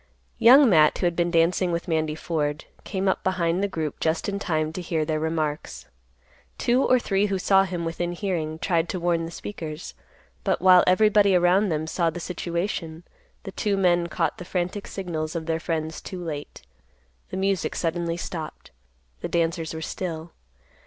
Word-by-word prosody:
Young 265 +4 +8
Matt, 155 -7 +5
who - - -1
had 175 -1 +1
been 175 0 +1
dancing 170 +2 +2
with 170 +1 -3
Mandy 155 -2 0
Ford, 150 -2 -2 0.2
came 195 -1 -2
up 190 - +1
behind 180 -1 0
the 200 - +1
group 160 -6 -4
just 160 0 0
in 200 0 -2
time 155 -5 -1
to 180 - -4
hear 165 -3 -1
their 155 0 -1
remarks. 155 -1 -3 0.7
Two 245 +2 +2
or 255 - +4
three 205 -4 +1
who 195 -1 -1
saw 195 +1 +4
him 175 -2 -4
within 175 +1 -2
hearing 170 -4 -2
tried 170 -1 0
to 185 - -2
warn 170 -1 0
the 165 - -7
speakers, 160 -4 -7 0.5
but - - +1
while 185 -1 +7
everybody 200 +1 +5
around 180 +3 +4
them 155 -1 -1
saw 165 +1 0
the 170 +2 -6
situation, 170 -1 -4 0.4
the 195 - -7
two 200 0 -1
men 175 -2 +3
caught 165 -1 -1
the - - -6
frantic 180 +3 -3
signals 165 -4 -4
of 165 -1 -3
their 165 0 -1
friends 160 -2 -3
too 180 -2 -7
late. 150 -3 -6 0.7
The - - -5
music 195 -2 0
suddenly 170 0 -1
stopped. 170 -3 -7 0.5
The - - -4
dancers 165 -1 0
were 160 0 -5
still. 165 -1 -5
170 Hz, 180 wpm, -25 LUFS, 160-185 Hz, 0.7 s, Young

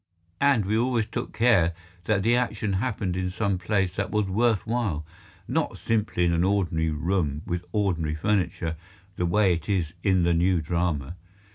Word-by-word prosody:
And 135 -8 +3
we 105 +3 0
always 120 -1 +1
took 120 +3 -5
care 105 -8 +3 0.3
that 100 -1 +1
the 115 +3 +4
action 110 -4 -1
happened 100 -3 -1
in 90 0 -1
some 100 0 -1
place 95 -1 0
that 95 - -1
was 105 -1 +1
worth 110 +3 +1
while, 110 -10 -1 0.4
not - - -1
simply 105 -5 0
in 85 - +2
an 85 +1 +2
ordinary 90 -5 +1
room 75 -1 -1
with 90 0 -3
ordinary 85 -7 0
furniture, 85 -3 -1 0.4
the 90 - 0
way 95 +1 +3
it 85 +3 -5
is 85 -5 0
in 95 -3 +2
the 85 0 +3
new 90 +1 +2
drama. 85 -1 -2
95 Hz, 170 wpm, -26 LUFS, 85-105 Hz, 0.4 s, the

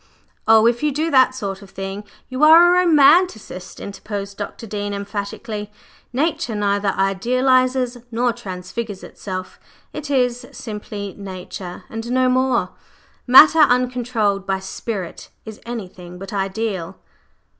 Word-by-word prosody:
"Oh, 220 0 +6
if 235 0 +2
you 300 0 +1
do 315 +4 -1
that 260 -1 +5
sort 195 -5 -5
of 200 - -13
thing 195 +1 -6 0.2
you 260 +3 -2
are 340 +3 +8
a - - +5
romancist," 295 - +3
interposed 200 0 -6
Dr. 205 +3 -7
Dean 205 -1 -4
emphatically. 205 +1 -5 0.4
"Nature 260 -4 -1
neither 205 0 0
idealizes 255 +5 +1
nor 240 +1 0
transfigures 205 -1 -6
itself; 185 -2 -7 0.3
it 300 -1 -6
is 250 -2 0
simply 210 -3 -7
Nature 185 -2 -8
and 225 +1 -6
no 255 0 +2
more. 255 -7 +1 0.6
Matter 300 +6 +8
uncontrolled 245 -7 +2
by 195 0 +1
Spirit 190 -1 -6 0.2
is 220 -1 -10
anything 180 -6 -7
but 195 +2 -9
ideal." 195 -2 -3
220 Hz, 125 wpm, -20 LUFS, 195-255 Hz, 0.6 s, are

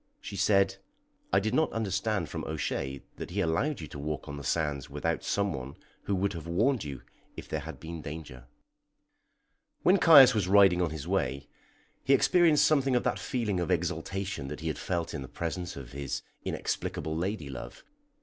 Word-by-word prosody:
She - - -8
said: 95 0 +3 0.5
"I - - +5
did 110 - -2
not 160 - +2
understand 100 -3 -1
from - - -5
O'Shea 70 0 -3
that - - -6
he 95 +4 -3
allowed 100 - 0
you 80 - -6
to 75 - -8
walk 75 +1 -4
on 70 - -5
the 70 - -7
sands 75 -3 -1
without - - -2
some 100 -1 0
one 65 +1 -6 0.3
who 100 - 0
would 100 +2 0
have 85 -1 -7
warned 115 +9 +2
you 70 -4 -7 0.3
if - - -7
there - - -2
had - - -8
been 80 0 -7
danger." 75 -5 -8 1.4
When 190 +2 +5
Caius 140 -7 +9
was 105 -5 0
riding 95 -2 +6
on 85 - +1
his 80 0 -6
way, 70 -8 -1 0.6
he 135 - +5
experienced 165 -3 +5
something 135 -4 +3
of 125 - +2
that - - 0
feeling 115 -8 -1
of 85 - -2
exaltation 90 -1 -2
that 75 +2 -6
he 80 - -2
had 75 - -4
felt 85 -2 -2
in - - -4
the 65 - -7
presence 85 +4 -4
of 65 -3 -9
his 70 0 -4 0.2
inexplicable 80 0 -3
lady 85 -4 -3
love. 65 - -8
90 Hz, 190 wpm, -29 LUFS, 75-105 Hz, 1.4 s, Caius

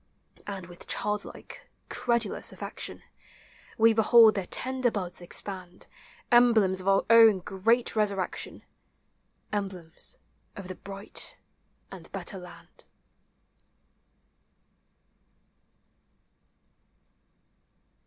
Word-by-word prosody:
And 195 -3 -5
with 175 0 -12
childlike, 210 0 -4 0.2
credulous 235 -4 -1
affection, - - -6 0.7
We 225 0 +5
behold 220 0 +7
their 195 -3 -3
tender 255 -1 +1
buds 185 -5 -4
expand 180 0 -4 0.2
— - - -26
Emblems 220 -6 +5
of 185 - -8
our 195 0 +3
own 225 -3 +8
great 210 +7 +1
resurrection. 200 -3 -2 0.9
Emblems 190 -5 -5 0.4
of 195 -2 -8
the - - -4
bright 195 +2 -3 0.5
and - - -11
better 195 - -4
land. 180 -1 -13
200 Hz, 85 wpm, -28 LUFS, 185-225 Hz, 0.9 s, own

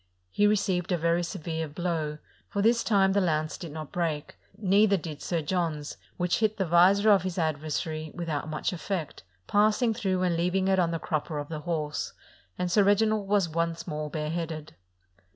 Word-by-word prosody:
He 205 - +3
received 190 -4 +1
a 175 - +2
very 170 +1 +1
severe 160 -1 -4
blow, 155 -1 -2 0.3
for 200 - -1
this 235 +1 +4
time 195 -3 +3
the 200 - +3
lance 155 -3 0
did 170 -4 -8
not 155 -1 -7
break; 160 -4 -2 0.2
neither 200 0 +4
did 155 -4 -7
Sir 170 -3 -1
John's, 155 -3 -2 0.2
which 180 0 +1
hit 215 -1 +1
the 190 - 0
visor 190 +5 +5
of 200 - +5
his 185 -1 -4
adversary 155 0 -2
without 160 -3 -3
much 155 +4 -2
effect, 175 -3 -4 0.2
passing 215 +3 +3
through 185 -3 -1
and 175 -2 +2
leaving 180 +3 +1
it 190 -1 +3
on 175 -2 +3
the 165 - -1
crup 155 -2 -2
per 155 - -5
of 145 0 -5
the 155 -2 -4
horse, 155 -2 -3 0.4
and 180 -1 -1
Sir 205 - +5
Reginald 205 +1 +2
was 200 -3 +3
once 165 +1 -2
more 150 0 -4
bare 150 0 -3
headed. 160 -2 -4
170 Hz, 190 wpm, -28 LUFS, 155-195 Hz, 0.4 s, visor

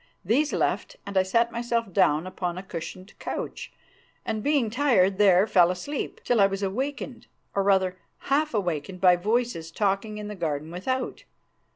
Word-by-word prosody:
These 275 - +2
left, - - -1
and 200 - -7
I 190 - +6
sat 230 +5 +1
myself 235 -3 -2
down 150 +2 +3
upon 180 -1 -4
a 185 - -5
cushioned 185 +2 -7
couch, - - -5 0.5
and, 215 - -2
being 280 -4 +1
tired, 215 -8 +3
there 195 -2 +6
fell 180 -5 +5
asleep, 220 +11 -4
till 240 -4 +2
I 195 - +7
was 195 0 -4
awakened, 255 +5 -3 0.3
or, 200 - +1
rather, 190 -2 +2 0.2
half 295 -1 +1
awakened 180 -2 -2
by 180 -1 +6
voices 210 -3 -1
talking 200 +4 -1
in 210 0 -6
the 210 - -5
garden 160 -4 -3
without. 255 +9 -3
195 Hz, 165 wpm, -26 LUFS, 180-235 Hz, 0.5 s, I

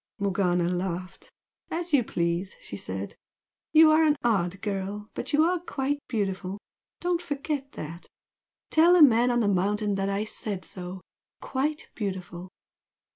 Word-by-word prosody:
Morgana 180 -3 +1
laughed. 180 0 -3 0.4
"As 345 0 -3
you 270 -4 +5
please!" 170 -1 -1
she - - -8
said 95 0 -5 0.6
"You 315 0 +8
are 310 +1 +5
an 300 -2 +4
odd 195 -6 +1
girl, 205 +1 -3
but - - -5
you 300 +2 +5
are 355 +2 +2
quite 285 -4 -2
beautiful! 195 -4 -2 0.4
Don't 350 -1 0
forget 285 -3 -3
that! 165 +3 -8 0.6
Tell 330 +3 +6
the 355 -3 +8
man 245 -2 +6
on 240 -1 +2
the 215 - +2
mountain 205 +2 +1
that 195 - 0
I 200 +1 0
said 205 -3 -4
so! 180 0 -7 0.4
quite 295 +3 -2
beautiful! 185 -3 -5
205 Hz, 145 wpm, -27 LUFS, 185-290 Hz, 0.6 s, You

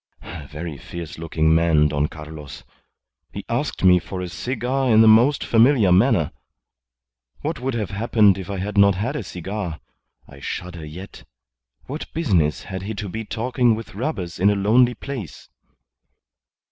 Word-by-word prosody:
A 80 -4 -9
very 75 +1 -7
fierce 85 -3 -8
looking 80 -1 +1
man, 80 -2 +3
Don 75 0 0
Carlos. 75 -2 -10 0.7
He - - -7
asked - - -2
me 90 -1 +6
for 95 +2 -7
a 90 -1 -4
cigar 125 +7 -2
in 110 -1 +6
a - - +6
most 120 +6 +5
familiar 115 -4 +4
manner. 95 - +3 1.1
What - - -3
would 130 0 -2
have 105 -5 -3
happened 105 -2 +3
if 95 0 -8
I 100 - -3
had 100 +2 -1
not 100 -1 +6
had 115 +10 -2
a 150 - -2
cigar? 90 -3 -5 0.5
I 70 - -14
shudder 85 +3 -6
yet. 90 +6 -10 0.6
What 150 +4 -7
business 90 - +1
had 95 -1 -6
he 105 +3 -5
to 105 0 -5
be 110 +4 -5
talking 120 +1 +1
with 115 +1 -9
robbers 100 - -4
in 100 +3 +4
a 105 - +2
lonely 120 +5 +3
place?" 125 - -8
100 Hz, 160 wpm, -22 LUFS, 85-115 Hz, 1.1 s, me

